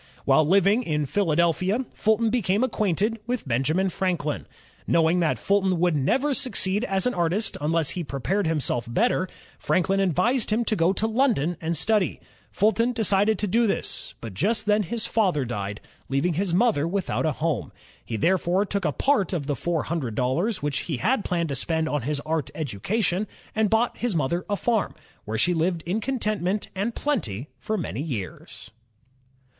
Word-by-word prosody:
While 155 - +4
Uving 200 +6 +4
in 150 -9 -1
Philadelphia, 175 - +1
Fulton 220 +1 +2
became 215 -2 +1
acquainted 215 -2 0
with 245 - -2
Benjamin 150 +10 +1
Franklin. 175 -6 -2 0.4
Knowing 165 +1 +3
that 165 -3 +1
Fulton 195 -3 +1
would 175 -2 +2
never 265 - +1
succeed 210 -6 0
as 195 -5 0
an 250 - +1
artist 180 +5 0
unless 160 0 +1
he 180 - -3
prepared 165 +7 -1
himself 130 -7 0
better, 190 - +1 0.3
Franklin 195 +2 +1
advised 220 - +1
him 225 +2 +1
to 220 - +1
go 170 -1 +3
to 200 +3 0
London 220 - +1
and 165 0 -1
study. 210 +3 +1 0.3
Fulton 230 +4 +2
decided 215 -1 +2
to - - -1
do 225 +4 +2
this; - - -3
but 115 -4 -7
just 210 - 0
then 210 0 +3
his 220 +4 -3
father 185 - +1
died, 105 -3 -4 0.3
leaving 140 +6 +1
his 185 +3 -1
mother 180 -5 +2
without 185 -2 -1
a 155 - +1
home. 155 -6 -2 0.3
He 115 - -4
therefore 185 - +2
took 200 -1 -2
a 150 - +2
part 205 - +1
of 160 -6 -2
the 145 0 -1
four 165 +3 -1
hundred 145 -9 -3
dollars 150 - 0
which 145 -1 0
he 155 -6 -3
had 225 - +1
planned 170 -3 -1
to 140 - -2
spend 160 +4 0
on 150 -2 -1
his 145 +4 -1
art 155 -3 -2
education, 180 - -1 0.3
and 220 -1 +2
bought 225 +3 +1
his 240 -5 -1
mother 165 +4 -1
a 205 - +1
farm, 225 0 0 0.3
where 110 +1 -3
she 175 +10 +3
lived 165 0 0
in 190 +6 -1
contentment 215 -5 -1
and 205 +5 -2
plenty 145 - -2
for 215 - -2
many 140 - -3
years. 115 - -6
180 Hz, 175 wpm, -25 LUFS, 155-215 Hz, 0.4 s, While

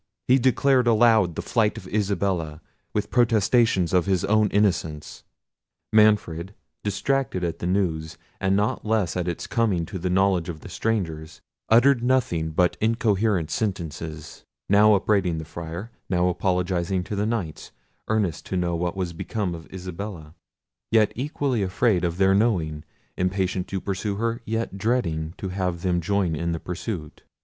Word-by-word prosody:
He 130 +2 +5
declared 130 0 +3
aloud 110 -6 +4
the - - -4
flight 110 -3 +1
of 95 - -9
Isabella, 95 -6 -1 0.3
with 105 - -2
protestations 115 -6 +3
of 90 0 +3
his 95 -3 +1
own 110 0 +3
innocence. 90 -7 -1 0.7
Manfred, 105 -4 +3 0.3
distracted 105 -1 -1
at 85 -1 -2
the 85 - -3
news, 80 -4 -1 0.2
and 95 0 +1
not 105 +2 0
less 110 -5 0
at 90 -1 -2
its 85 - -3
coming 100 -8 0
to 95 - -6
the 90 +2 -2
knowledge 95 -2 +2
of 80 -3 -6
the - - -10
strangers, 80 -9 -3 0.3
uttered 120 +3 +5
nothing 120 -11 +1
but 90 +3 +1
incoherent 110 - +1
sentences, 80 -5 -4 0.2
now 105 +1 +6
upbraiding 95 -4 +1
the 80 - -5
Friar, 85 +7 -7 0.2
now 90 -1 +2
apologising 90 0 0
to 105 - -5
the 105 +1 0
Knights, 100 -10 -3 0.4
earnest 105 -7 0
to 95 - -2
know 85 -1 0
what 90 +2 -2
was 90 -3 -2
become 95 +2 -3
of 80 -1 -10
Isabella, 90 -3 -7 0.6
yet 110 -2 +4
equally 135 -2 -1
afraid 95 0 +1
of 85 -1 -1
their 95 0 +4
knowing; 90 -8 +1 0.3
impatient 90 0 -1
to 95 - -3
pursue 100 +2 -3
her, 115 +2 -2
yet 115 -3 -3
dreading 85 -9 -1
to 95 - -4
have 90 -2 -2
them 90 -2 +1
join 90 -1 0
in 85 +2 -2
the 80 - -3
pursuit. 90 -3 -6
95 Hz, 155 wpm, -24 LUFS, 85-110 Hz, 0.7 s, now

